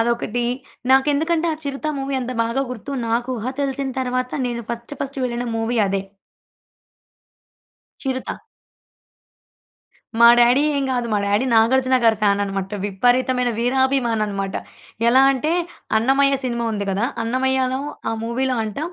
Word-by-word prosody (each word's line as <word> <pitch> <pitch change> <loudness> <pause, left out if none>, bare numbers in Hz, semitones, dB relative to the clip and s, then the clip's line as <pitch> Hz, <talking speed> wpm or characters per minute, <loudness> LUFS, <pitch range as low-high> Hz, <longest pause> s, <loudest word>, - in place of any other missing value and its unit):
అదొకటి. 235 0 0 0.5
నాకెందుకంటే 300 +5 +3
ఆ - - -1
'చిరుత' 280 +2 -3
మూవీ 270 0 -3
అంత 250 - -4
బాగా 235 +4 -1
గుర్తు. 250 +3 -7 0.2
నాకు 240 +2 0
ఊహ 220 - -5
తెలిసిన 275 -1 -1
తర్వాత 255 0 -2
నేను 235 -1 -3
ఫస్ట్ 235 +4 -6
ఫస్ట్ 275 0 -4
వెళ్ళిన 240 0 -2
మూవీ 225 +1 -1
అదే. 195 0 -1 2.0
'చిరుత'. 260 -1 -4 1.8
మా 235 - +9
డాడీ 245 +3 +5 0.2
ఏం 280 - 0
గాదు. 245 -2 -1
మా 210 - +2
డాడీ 205 +5 +1
'నాగార్జున' 255 +3 +4
గారి 225 -2 +4
ఫ్యానన్నమాట. 200 -1 0 0.2
విపరీతమైన 245 +5 +1
వీరాభిమాననమాట. 235 -6 0 0.5
ఎలా 255 +3 +6
అంటే 285 +4 -1 0.5
'అన్నమయ్య' 270 +3 +3
సినిమా 235 -1 -2
ఉంది 205 -1 -3
కదా! 200 +4 0 0.2
అన్నమయ్యలో 260 +2 0 0.3
ఆ - - -1
మూవీలో 255 +3 -1
అంట 215 +4 -5
245 Hz, 125 wpm, -21 LUFS, 230-265 Hz, 2.0 s, మా